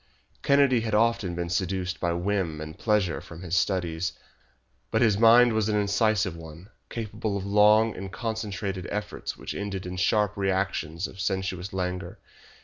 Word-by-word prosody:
Kennedy 140 -3 +4
had 110 -2 -1
often 110 -5 +2
been 85 0 -3
seduced 95 0 -1
by 85 - 0
whim 85 -2 -1
and 80 0 -7
pleasure 105 -6 +1
from 85 +1 -11
his 90 -1 -2
studies, 90 -2 0 0.8
but 110 +2 +2
his 110 -4 +4
mind 120 +1 +7
was 110 -1 +1
an 105 - +1
incisive 100 -3 +1
one, 80 +4 -11 0.2
capable 110 -2 -3
of 95 - -5
long 105 +2 +4
and 95 0 -7
concentrated 105 -5 -4
efforts 105 0 -4
which - - -6
ended 100 -2 -4
in 90 0 -5
sharp 105 +2 +2
reactions 95 -3 -1
of 95 - -9
sensuous 95 -1 -2
languor. 90 -1 -3
95 Hz, 155 wpm, -26 LUFS, 90-110 Hz, 0.8 s, mind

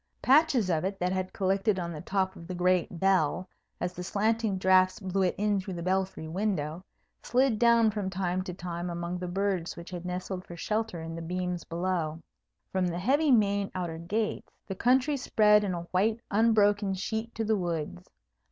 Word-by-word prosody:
Patches 265 - +4
of 155 -2 +1
it, 195 +1 -2
that 180 0 -1
had 185 0 -2
collected 195 +2 +1
on 170 -2 -3
the 155 -2 -6
top 190 +1 -1
of 165 - -11
the 185 - -5
great 180 -1 +1
bell 185 -1 +2 0.3
as 180 0 -2
the 180 - -7
slanting 215 +2 0
draughts 185 0 +4
blew 195 -1 -1
it 185 - +1
in 205 -1 +1
through 190 -1 -6
the 170 - -5
belfry 185 -3 -1
window, 175 -2 -2 0.4
slid 250 -3 +2
down 235 -2 +5
from 200 -2 -3
time 185 -1 -1
to 180 - -4
time 175 0 -5
among 170 +1 -4
the 180 - -4
birds 190 -1 -1
which 170 +2 -9
had 175 -1 -6
nestled 180 +1 -4
for 175 - -10
shelter 215 -3 -2
in 165 0 -6
the 165 - -6
beams 180 0 -3
below. 170 -2 -2 0.5
From 185 -1 +1
the 170 -1 -3
heavy 280 - +2
main 205 -5 +3
outer 170 -3 -3
gates, 210 +6 -2
the 195 - -4
country 255 +7 +2
spread 210 -4 +4
in 190 -3 -1
a 170 - -4
white 215 +5 +2
unbroken 205 -2 +3
sheet 220 +4 -4
to 225 - -1
the 220 0 +2
woods. 160 - -4
185 Hz, 190 wpm, -29 LUFS, 175-210 Hz, 0.5 s, down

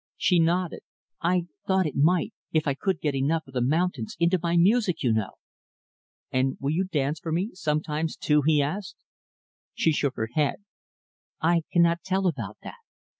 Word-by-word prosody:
She 180 -3 +3
nodded. 170 +1 +1 0.4
"I 175 0 +1 0.2
thought 190 -1 +3
it 150 - -2
might 165 +5 +2 0.2
if 155 -2 +1
I 140 - +2
could 185 +5 -2
get 150 -2 0
enough 145 +4 0
of 135 - -16
the 125 - 0
mountains 145 -2 0
into 170 +2 +3
my 170 0 +1
music, 195 0 +3
you 120 -3 +3
know." 110 -1 -1 1.0
"And 130 0 0
will 140 +1 -1
you 180 +5 +1
dance 150 -3 -1
for 165 - -5
me, 185 +8 -1
sometimes 155 -2 -2
too?" 150 0 +2
he 150 -1 +3
asked. 190 +7 -4 0.8
She 160 - +2
shook 140 -3 0
her 110 0 -3
head. 150 +7 0 0.8
"I 165 0 +2
cannot 170 -1 +3
tell 190 0 -1
about 120 - -2
that. - - -9
160 Hz, 175 wpm, -26 LUFS, 140-180 Hz, 1.0 s, She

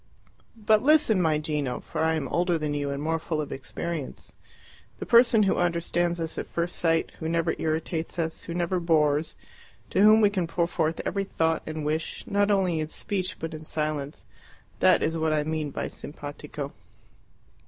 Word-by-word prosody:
But 215 -1 +3
listen, 285 -8 +4
my 160 -3 +2
Gino, 150 -4 -2
for - - -3
I 160 0 +2
am 150 -4 -2
older 175 0 +1
than 150 -2 -2
you 145 -1 -2
and 140 0 -3
more 165 +1 0
full 155 -1 -3
of 150 - -4
experience. 155 +2 -4 0.6
The - - -5
person 235 -2 +6
who 195 - +2
understands 175 0 0
us 165 -1 -3
at - - -5
first 170 +1 -2
sight, 165 -1 +1
who 160 - -3
never 165 0 +1
irritates 160 +2 -2
us, 160 -1 -2
who 170 - -6
never 175 +1 0
bores, 155 -2 +2 0.6
to - - +2
whom 215 +1 +7
we 205 -2 +4
can 185 -4 -1
pour 170 +1 +1
forth 160 -1 -1
every 200 0 -1
thought 160 -4 0
and 155 -1 -4
wish, 155 +2 -2
not 205 0 +1
only 185 -5 +2
in 155 - -2
speech 185 +3 -3
but 165 0 -5
in 155 0 -7
silence 150 -2 -3 0.6
that - - +5
is 160 +1 0
what 160 -1 +1
I 150 -1 +1
mean 155 -1 -2
by - - -4
SIMPATICO." 145 -1 -7
165 Hz, 185 wpm, -26 LUFS, 155-175 Hz, 0.6 s, whom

